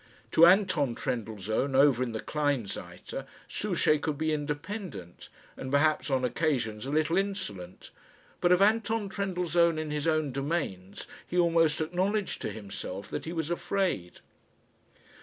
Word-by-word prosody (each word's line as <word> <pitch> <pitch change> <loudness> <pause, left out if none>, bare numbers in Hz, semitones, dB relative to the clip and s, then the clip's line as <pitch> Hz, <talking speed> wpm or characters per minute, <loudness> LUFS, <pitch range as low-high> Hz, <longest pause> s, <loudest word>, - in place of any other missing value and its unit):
To 170 - +8
Anton 180 - +3
Trendellsohn, 110 +3 -2
over 135 -2 +5
in 125 -2 -1
the 110 - -4
Kleinseite, 140 -9 -3 0.2
Souchey 150 - +1
could 150 -1 -2
be 155 +1 0
independent, 150 - -5 0.3
and 130 - -6
perhaps 150 +2 +2
on 130 -2 +1
occasions 125 -5 -1
a - - -3
little 155 +3 +2
insolent; 145 - -4 0.5
but 175 - +3
of 180 +2 +6
Anton 220 0 +2
Trendellsohn 175 -4 +1
in 155 -1 -3
his 150 +1 -2
own 155 -3 +1
domains 135 - -3 0.2
he 180 - -3
almost 165 -3 +3
acknowledged 185 +5 -1
to - - -2
himself 100 -2 -7
that - - -4
he 160 - -4
was 165 -1 -3
afraid. 175 - -1
155 Hz, 140 wpm, -29 LUFS, 125-175 Hz, 0.5 s, To